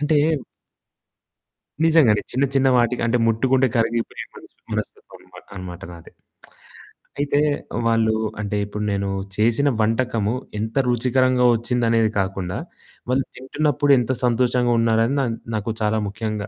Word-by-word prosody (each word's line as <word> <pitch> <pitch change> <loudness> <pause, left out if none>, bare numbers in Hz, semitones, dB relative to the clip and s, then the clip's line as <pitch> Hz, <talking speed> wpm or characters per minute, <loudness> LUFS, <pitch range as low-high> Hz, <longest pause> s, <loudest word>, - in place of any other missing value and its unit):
అంటే 150 0 +2 1.7
నిజంగానే 155 -10 +4
చిన్న, 135 +3 +1
చిన్న 135 0 +3
వాటికి 120 0 +1
అంటే 120 +1 +2
ముట్టుకుంటే 130 +3 +2
కరిగిపోయే 115 0 -1
మనసు - - -15 0.2
మనస్తత్వం - - -6
ఉన్నమాట - - -16
అన్నమాట 90 -2 -8
నాది. 85 -1 -14 1.1
అయితే 145 0 +1 0.5
వాళ్ళు 115 -1 +2 0.3
అంటే, 105 0 -2
ఇప్పుడు 105 +1 -5
నేను 100 0 -1 0.3
చేసిన 115 +7 +2
వంటకము 115 -1 0 0.3
ఎంత 110 +1 -4
రుచికరంగా 125 +1 +2
వచ్చిందనేది 115 -2 +1
కాకుండా, 95 -1 -2 0.5
వాళ్ళు 130 +1 +1
తింటున్నప్పుడు 145 +2 0
ఎంత 125 +2 -1
సంతోషంగా 120 0 +2
ఉన్నారని 115 +3 +2
నన్ 115 -3 -2 0.2
నాకు 110 +2 -2
చాలా 110 +1 +1
ముఖ్యంగా 105 0 -4
115 Hz, 120 wpm, -22 LUFS, 110-130 Hz, 1.7 s, నిజంగానే